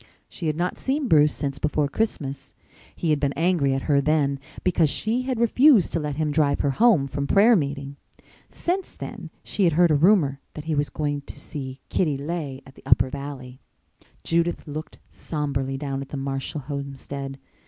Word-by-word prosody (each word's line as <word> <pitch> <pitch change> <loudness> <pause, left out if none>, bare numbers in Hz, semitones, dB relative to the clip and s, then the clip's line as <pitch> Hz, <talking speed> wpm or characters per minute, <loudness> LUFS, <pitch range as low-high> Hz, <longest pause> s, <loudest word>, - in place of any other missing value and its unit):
She 170 - -5
had 155 - 0
not 175 +1 -1
seen 275 +1 0
Bruce 150 -5 +5
since 140 -2 -3
before 150 -1 +1
Christmas. 140 -6 -3 0.4
He 165 - 0
had 150 - +2
been 140 -1 0
angry 165 -5 +2
at 135 - -2
her 140 -2 +3
then 140 -2 +1 0.2
because 170 -4 +3
she 225 - 0
had 255 -2 -2
refused 235 - +5
to 165 - +1
let 150 -2 -3
him 155 0 0
drive 145 -1 +2
her 140 - +1
home 205 - +4
from 140 +1 -3
prayer 215 +7 +6
meeting. 140 -4 -2 0.5
Since 365 +2 -3
then - - -7
she 200 - 0
had 170 - +3
heard 175 +1 +4
a - - +5
rumor 150 -3 +4 0.2
that 150 - -7
he 160 - -1
was 145 -1 0
going 145 -1 -2
to - - -9
see 135 -2 -7
Kitty 150 -6 +1
Leigh 145 -2 -4
at 135 - -14
the - - -17
Upper 130 - +3
Valley. 130 -2 -7 0.6
Judith 170 +1 0
looked 155 +1 -6
sombrely 135 -3 -3
down 135 -1 -3
at 135 - -8
the 145 - -5
Marshall 135 +2 -3
homestead. 140 0 -6
145 Hz, 185 wpm, -24 LUFS, 140-170 Hz, 0.6 s, prayer